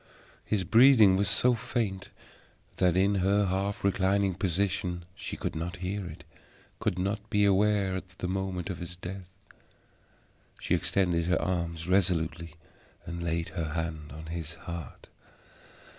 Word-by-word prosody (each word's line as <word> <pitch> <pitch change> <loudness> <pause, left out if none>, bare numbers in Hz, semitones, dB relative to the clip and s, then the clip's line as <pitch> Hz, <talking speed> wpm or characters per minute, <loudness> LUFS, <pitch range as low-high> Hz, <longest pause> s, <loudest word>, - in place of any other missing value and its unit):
His 105 -3 0
breathing 110 -1 +7
was 100 +1 +2
so 120 +5 +4
faint 110 -4 -2 0.7
that 90 -1 +3
in 100 +2 +3
her 100 +2 +3
half 95 +2 -1
reclining 100 0 +2
position 90 -1 -1
she - - -6
could - - -3
not 85 +1 -3
hear 95 +2 -4
it, 80 0 -10 0.6
could 90 - -1
not 100 +3 -2
be 105 0 +3
aware 100 -1 +3
of 95 -1 -7
the 90 - -3
moment 95 -1 -2
of 90 - -6
his 85 0 -6
death. 90 +1 -8 1.2
She - - -1
extended 85 -3 +1
her 90 - +2
arm 85 -2 -1
resolutely 85 -3 +1 0.5
and 85 0 -5
laid 85 -1 -1
her 80 -3 -4
hand 80 -3 -4
on 80 +3 -9
his 80 -1 -5
heart. 85 -2 -8
95 Hz, 145 wpm, -29 LUFS, 85-100 Hz, 1.2 s, breathing